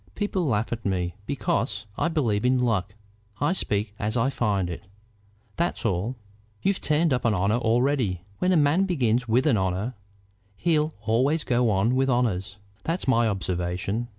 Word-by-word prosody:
People 195 Hz, -5 st, -1 dB
laugh 110 Hz, -2 st, 0 dB
at 115 Hz, -1 st, -5 dB
me 90 Hz, -3 st, -1 dB
because 115 Hz, -6 st, -1 dB
I -, -, 0 dB
believe 120 Hz, -11 st, 0 dB
in 130 Hz, +1 st, +3 dB
luck. 110 Hz, -5 st, 0 dB, 0.4 s
I 145 Hz, +5 st, +2 dB
speak 105 Hz, -, -2 dB
as 110 Hz, +3 st, -1 dB
I 125 Hz, +4 st, +2 dB
find 105 Hz, -8 st, 0 dB
it; 85 Hz, -, -6 dB, 0.8 s
that's 170 Hz, -6 st, -1 dB
all. 105 Hz, +4 st, 0 dB, 0.5 s
You've 195 Hz, -1 st, +1 dB
turned 155 Hz, 0 st, +2 dB
up 125 Hz, -, 0 dB
an 115 Hz, -4 st, +2 dB
honor 100 Hz, +5 st, +2 dB
already. 120 Hz, -5 st, +1 dB, 0.2 s
When 180 Hz, -, +2 dB
a 180 Hz, -, +4 dB
man 155 Hz, +6 st, +3 dB
begins 125 Hz, -, +1 dB
with 120 Hz, +4 st, +2 dB
an 135 Hz, -8 st, +4 dB
honor 95 Hz, +5 st, -1 dB, 0.6 s
he'll 155 Hz, -2 st, +1 dB
always 130 Hz, +8 st, +1 dB
go 120 Hz, -1 st, +2 dB
on 105 Hz, +4 st, +2 dB
with 135 Hz, +1 st, +2 dB
honors; 105 Hz, -6 st, 0 dB, 0.3 s
that's 165 Hz, 0 st, -2 dB
my 120 Hz, -3 st, +4 dB
observation. 95 Hz, +3 st, -2 dB
120 Hz, 165 wpm, -25 LUFS, 100-140 Hz, 0.8 s, a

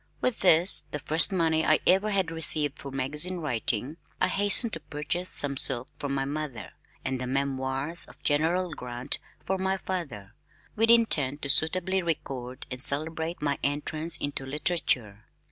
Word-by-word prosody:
With 255 Hz, -, -1 dB
this, 175 Hz, -2 st, +4 dB
the 150 Hz, -, -4 dB
first 155 Hz, +6 st, +4 dB
money 165 Hz, -3 st, +1 dB
I -, -, +3 dB
ever 195 Hz, +3 st, +3 dB
had 190 Hz, -5 st, 0 dB
received 155 Hz, -3 st, +2 dB
for 140 Hz, -, -7 dB
magazine 150 Hz, +7 st, -3 dB
writing, 130 Hz, -1 st, -2 dB, 0.2 s
I -, -, +2 dB
hastened 205 Hz, +3 st, +4 dB
to 165 Hz, -, -4 dB
purchase 155 Hz, +4 st, -4 dB
some 140 Hz, -1 st, -1 dB
silk 125 Hz, 0 st, +3 dB
for 145 Hz, -, -4 dB
my 135 Hz, 0 st, -1 dB
mother, 145 Hz, -5 st, -6 dB, 0.3 s
and 130 Hz, -1 st, -2 dB
the 125 Hz, -, -4 dB
Memoirs 135 Hz, +3 st, -1 dB
of -, -, -17 dB
General 165 Hz, +5 st, +1 dB
Grant 125 Hz, -1 st, -3 dB, 0.3 s
for 190 Hz, 0 st, -2 dB
my 190 Hz, 0 st, -1 dB
father, 140 Hz, -, -6 dB, 0.4 s
with 225 Hz, +1 st, +2 dB
intent 150 Hz, -, +4 dB
to 140 Hz, -, -3 dB
suitably 185 Hz, +6 st, +3 dB
record 130 Hz, -7 st, -5 dB
and 125 Hz, +1 st, -6 dB
celebrate 160 Hz, +3 st, -1 dB
my 145 Hz, -1 st, -1 dB
entrance 155 Hz, +3 st, -1 dB
into 145 Hz, -2 st, -4 dB
literature. 135 Hz, -, -2 dB
150 Hz, 160 wpm, -27 LUFS, 135-175 Hz, 0.4 s, this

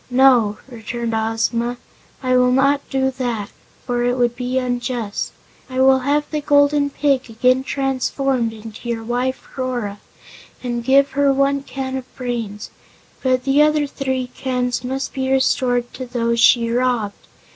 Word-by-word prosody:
"No," 245 Hz, -5 st, +4 dB
returned 235 Hz, -1 st, -5 dB
Ozma, 225 Hz, +2 st, 0 dB, 0.5 s
"I 255 Hz, 0 st, +2 dB
will 250 Hz, 0 st, +4 dB
not 275 Hz, +2 st, +3 dB
do 265 Hz, 0 st, +1 dB
that, 240 Hz, -6 st, -3 dB, 0.3 s
for 245 Hz, -1 st, 0 dB
it 245 Hz, +1 st, +1 dB
would 240 Hz, -1 st, +1 dB
be 250 Hz, +1 st, -2 dB
unjust. 245 Hz, -4 st, -2 dB, 0.4 s
I 255 Hz, 0 st, -3 dB
will 265 Hz, 0 st, +5 dB
have 290 Hz, +3 st, +1 dB
the 305 Hz, -1 st, -1 dB
Golden 285 Hz, 0 st, +3 dB
Pig 275 Hz, -3 st, 0 dB
again 255 Hz, +3 st, +2 dB
transformed 270 Hz, -2 st, -1 dB
into 220 Hz, +1 st, -9 dB
your 230 Hz, -1 st, -2 dB
wife 245 Hz, +3 st, -2 dB
Rora, 245 Hz, -6 st, -3 dB, 0.6 s
and 240 Hz, -1 st, -2 dB
give 275 Hz, +2 st, +4 dB
her 280 Hz, 0 st, +3 dB
one 275 Hz, +1 st, +2 dB
can 265 Hz, -1 st, -4 dB
of 260 Hz, -1 st, -10 dB
brains, 230 Hz, -5 st, -4 dB, 0.5 s
but 255 Hz, -1 st, +1 dB
the 275 Hz, +2 st, +3 dB
other 300 Hz, 0 st, +3 dB
three 265 Hz, -2 st, -2 dB
cans 250 Hz, -2 st, -2 dB
must 265 Hz, +2 st, -3 dB
be 265 Hz, 0 st, -2 dB
restored 250 Hz, -2 st, +1 dB
to 255 Hz, -1 st, -6 dB
those 235 Hz, -1 st, 0 dB
she 230 Hz, 0 st, +5 dB
robbed. 240 Hz, -4 st, -1 dB
255 Hz, 150 wpm, -20 LUFS, 240-270 Hz, 0.6 s, will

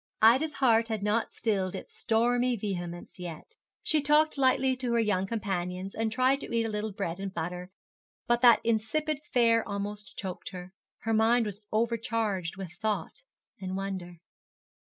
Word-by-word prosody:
Ida's 265 Hz, +8 st, +5 dB
heart 230 Hz, -4 st, +3 dB
had 220 Hz, -3 st, -3 dB
not 210 Hz, +2 st, +1 dB
stilled 195 Hz, -5 st, -1 dB
its -, -, -8 dB
stormy 245 Hz, +2 st, +2 dB
vehemence 175 Hz, -5 st, -5 dB
yet. 175 Hz, -, -8 dB, 0.3 s
She 310 Hz, -1 st, +2 dB
talked 300 Hz, +2 st, +4 dB
lightly 260 Hz, -1 st, +3 dB
to 250 Hz, -2 st, -1 dB
her 235 Hz, -, +3 dB
young 205 Hz, -4 st, +1 dB
companions, 190 Hz, -3 st, -3 dB
and 225 Hz, 0 st, -1 dB
tried 255 Hz, +4 st, +3 dB
to -, -, -7 dB
eat 230 Hz, -1 st, +2 dB
a -, -, -2 dB
little 210 Hz, 0 st, -2 dB
bread 190 Hz, -3 st, -4 dB
and 195 Hz, 0 st, -4 dB
butter, 180 Hz, +1 st, -4 dB, 0.6 s
but 240 Hz, -1 st, +2 dB
that 240 Hz, -2 st, +7 dB
insipid 230 Hz, +7 st, 0 dB
fare 230 Hz, -2 st, +4 dB
almost 205 Hz, +1 st, -5 dB
choked 185 Hz, -3 st, -5 dB
her. 180 Hz, 0 st, -8 dB, 0.3 s
Her 225 Hz, -, -1 dB
mind 225 Hz, +2 st, +4 dB
was 205 Hz, 0 st, -5 dB
overcharged 220 Hz, -5 st, -1 dB
with 190 Hz, -4 st, -6 dB
thought 215 Hz, -1 st, -2 dB, 0.4 s
and 190 Hz, 0 st, -4 dB
wonder. 190 Hz, -3 st, -5 dB
220 Hz, 160 wpm, -29 LUFS, 190-235 Hz, 0.6 s, that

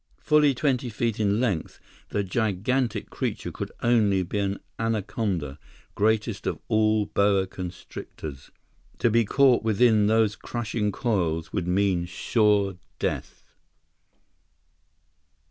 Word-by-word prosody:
Fully 150 Hz, -3 st, +3 dB
twenty 130 Hz, -2 st, 0 dB
feet 115 Hz, 0 st, -2 dB
in 105 Hz, 0 st, +2 dB
length, 105 Hz, -10 st, -1 dB, 0.3 s
the 100 Hz, -, -1 dB
gigantic 110 Hz, +5 st, -1 dB
creature -, -, -3 dB
could -, -, -6 dB
only 105 Hz, -6 st, +3 dB
be 100 Hz, +4 st, -3 dB
an 100 Hz, 0 st, -1 dB, 0.2 s
anaconda, 100 Hz, -, -2 dB, 0.3 s
greatest 110 Hz, 0 st, 0 dB
of -, -, -1 dB
all 110 Hz, -1 st, +3 dB
boa 100 Hz, -1 st, +2 dB
constrictors. 85 Hz, -6 st, -8 dB, 0.5 s
To 120 Hz, -, +2 dB
be 115 Hz, +1 st, +3 dB
caught 135 Hz, +2 st, +4 dB
within 110 Hz, -1 st, +3 dB
those 110 Hz, -1 st, +3 dB
crushing 110 Hz, -3 st, -2 dB
coils 90 Hz, -8 st, -1 dB
would 90 Hz, -3 st, -2 dB
mean 90 Hz, -1 st, +1 dB
sure 100 Hz, +1 st, +1 dB, 0.2 s
death! -, -, -3 dB
105 Hz, 110 wpm, -26 LUFS, 95-115 Hz, 0.5 s, caught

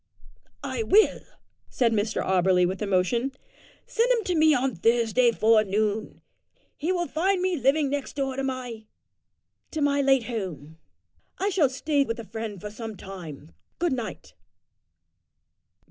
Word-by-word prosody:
"I -, -, -3 dB
will," 435 Hz, 0 st, +4 dB, 0.5 s
said 240 Hz, -3 st, +1 dB
Mr 210 Hz, 0 st, -1 dB
Auberly 185 Hz, -1 st, +3 dB
with 190 Hz, +3 st, -4 dB
emotion. 210 Hz, +7 st, 0 dB, 0.5 s
"Send 475 Hz, +2 st, +1 dB
him 470 Hz, -3 st, +2 dB
to 365 Hz, -, -1 dB
me 315 Hz, 0 st, +5 dB
on 260 Hz, -2 st, 0 dB
Thursday 235 Hz, +4 st, +3 dB
forenoon. 215 Hz, -1 st, +1 dB, 0.5 s
He 320 Hz, +5 st, -2 dB
will 350 Hz, -2 st, 0 dB
find 375 Hz, +4 st, +1 dB
me 370 Hz, 0 st, 0 dB
living 275 Hz, 0 st, +2 dB
next 285 Hz, -1 st, -3 dB
door 270 Hz, -2 st, -2 dB
to 270 Hz, -, -2 dB
my 250 Hz, -4 st, -5 dB, 0.8 s
to 315 Hz, -, -4 dB
my 285 Hz, -1 st, +2 dB
late 270 Hz, -2 st, +3 dB
home. 170 Hz, -, -6 dB, 0.6 s
I 395 Hz, -, 0 dB
shall 325 Hz, -8 st, +3 dB
stay 285 Hz, +2 st, +1 dB
with 230 Hz, -4 st, -4 dB
a -, -, -5 dB
friend 220 Hz, +1 st, -5 dB
there 210 Hz, +3 st, -7 dB
for -, -, -17 dB
some 225 Hz, -3 st, -7 dB
time. 165 Hz, -6 st, -9 dB, 0.3 s
Good 345 Hz, -4 st, 0 dB
night." 235 Hz, -4 st, -6 dB
240 Hz, 145 wpm, -26 LUFS, 210-285 Hz, 0.8 s, me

